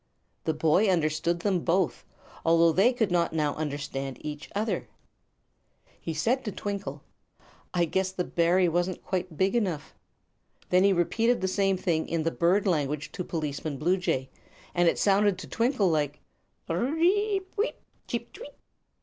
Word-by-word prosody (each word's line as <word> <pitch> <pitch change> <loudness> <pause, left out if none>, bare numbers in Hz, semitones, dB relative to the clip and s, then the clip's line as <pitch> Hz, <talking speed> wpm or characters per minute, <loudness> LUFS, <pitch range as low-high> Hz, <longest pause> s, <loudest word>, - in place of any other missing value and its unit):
The 160 - 0
boy 165 +7 +3
understood 170 0 +1
them 195 -2 +1
both, 175 +1 0 0.4
although 165 0 +5
they 195 +9 +4
could 225 -6 0
not 170 -2 +1
now 150 -2 +1
understand 140 -3 -4
each 150 -1 -6
other. 215 +2 -1 1.1
He 165 - -4
said 230 - 0
to 210 - -3
Twinkle: 200 0 -5 0.7
"I 175 -1 +2
guess 190 +3 0
the 185 -1 -2
berry 175 +2 +2
wasn't 175 +2 -1
quite 180 -4 -3
big 190 +4 +2
enough." 180 -11 -1 0.8
Then 180 +1 +4
he 200 - +5
repeated 225 +7 +2
the 190 - -1
same 195 0 +1
thing 165 -3 -1
in 165 -1 0
the 165 - 0
bird 180 +6 +2
language 150 -5 0
to 180 - -4
Policeman 150 -3 -3
Bluejay, 165 -5 0 0.4
and 175 -1 +4
it - - -1
sounded 200 -1 +3
to - - -8
Twinkle 230 -6 +1
like: 145 -2 0 0.5
"Pir 165 - -2
r - - 0
r 285 - -2
r - - -3
eep 385 +2 +1 0.5
cheep - - -4
tweet!" - - -10
175 Hz, 160 wpm, -27 LUFS, 160-200 Hz, 1.1 s, although